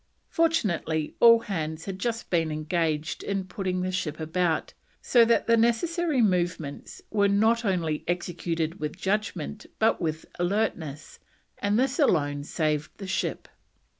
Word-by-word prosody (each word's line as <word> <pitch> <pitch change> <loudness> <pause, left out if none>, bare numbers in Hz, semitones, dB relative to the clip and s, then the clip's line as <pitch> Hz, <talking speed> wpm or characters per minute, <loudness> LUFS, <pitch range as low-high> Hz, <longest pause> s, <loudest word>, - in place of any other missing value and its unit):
Fortunately 175 - 0
all 230 -1 +8
hands 160 -6 -4
had 190 -1 -5
just 230 +2 -3
been 165 -3 +1
engaged 155 0 -1
in 195 -1 -1
putting 185 -1 -3
the 185 0 -1
ship 165 -5 -3
about, 160 +1 -1 0.3
"so 240 -2 +5
that 230 0 +3
the 230 - +4
necessary 270 +5 +2
movements 175 -7 -1
were 205 -2 +3
not 220 +4 +3
only 170 -7 0
executed 170 -1 -2
with 150 +2 -4
judgment 205 -1 -2
but 220 -2 +2
with 160 -1 -2
alertness, 175 -6 -2 0.4
and 205 +1 +1
this 265 +3 +1
alone 145 - +2
saved 150 -1 -2
the 200 - -7
ship." 185 - -2
180 Hz, 135 wpm, -27 LUFS, 160-220 Hz, 0.4 s, all